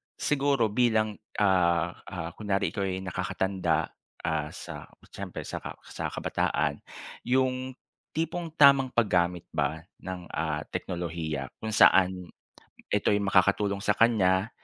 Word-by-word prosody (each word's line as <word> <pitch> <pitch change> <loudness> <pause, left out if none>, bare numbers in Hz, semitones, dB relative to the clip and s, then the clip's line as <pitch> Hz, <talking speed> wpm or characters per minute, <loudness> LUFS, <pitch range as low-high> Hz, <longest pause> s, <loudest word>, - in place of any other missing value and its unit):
siguro 140 -6 +1
bilang, 110 -2 +1 0.2
ah, 85 -4 +3 0.2
ah, 85 -2 -5
kunyari 100 +1 -1
ikaw 100 -4 -2
ay 95 0 -3
nakakatanda 90 -3 -1 0.3
ah 80 -2 -1
sa - - -8 0.2
siyempre - - -6
sa - - -5 0.2
sa - - -5
kabataan. 75 0 -1 0.5
'Yong 130 0 +1 0.4
tipong 165 +2 -2
tamang 140 -3 +7
paggamit 90 -8 +1
ba 80 +1 -1 0.2
ng 95 -1 -6
ah, 75 -1 -2
teknolohiya 80 -5 -4
kung 110 -1 -3
saan 90 -4 +5 0.6
ito'y 105 0 +2
makakatulong 100 0 +2
sa 105 - +4
kanya, 105 -2 +3
95 Hz, 115 wpm, -28 LUFS, 85-110 Hz, 0.6 s, tamang